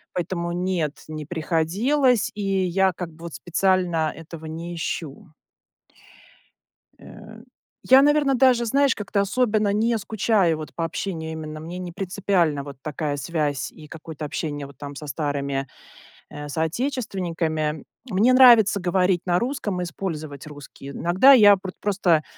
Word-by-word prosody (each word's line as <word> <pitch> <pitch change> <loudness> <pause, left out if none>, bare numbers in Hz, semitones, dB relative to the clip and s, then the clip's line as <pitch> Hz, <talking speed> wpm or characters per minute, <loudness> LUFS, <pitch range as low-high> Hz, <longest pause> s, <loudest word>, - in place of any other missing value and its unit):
Поэтому 170 -1 -2
нет, 175 -4 -2
не 155 -1 -6
приходилось, 200 - +1
и 210 - -5
я 190 -1 +1
как 170 -1 -6
бы 165 +2 -16
вот 170 - -7
специально 175 +1 +1
этого 160 0 -10
не 165 +2 -6
ищу. 165 +1 -5 1.7
Э, - - -13 0.5
я, 265 +1 +7
наверное, 290 -1 +3
даже, 250 -2 +4
знаешь, 275 +3 +2
как-то 200 -1 -1
особенно 210 -1 +1
не 225 +2 +1
скучаю 205 -4 +1
вот 155 - -8
по 165 - -2
общению- 165 -2 -4
именно 155 -1 -7
мне 170 +3 -7
не 180 -1 -6
принципиальна 180 -5 0
вот 140 -1 -10
такая 150 -1 -3
связь 145 -1 -2
и 155 -2 -13
какое-то 160 -1 -9
общение 145 -1 -4
вот 140 - -16
там 145 -1 -8
со 150 - -8
старыми, 140 -2 -2 0.6
э, 145 0 -7
соотечественниками. 165 - -2 0.3
Мне 215 +7 +4
нравится 235 -6 +7
говорить 180 0 +1
на 175 -1 +2
русском 235 -7 -2
и 180 - -1
использовать 155 -4 -6
русский, 145 -2 -11
иногда 180 - +5
я 205 -5 +8
про 185 0 -7
просто, 185 -6 +2
175 Hz, 140 wpm, -23 LUFS, 155-205 Hz, 1.7 s, я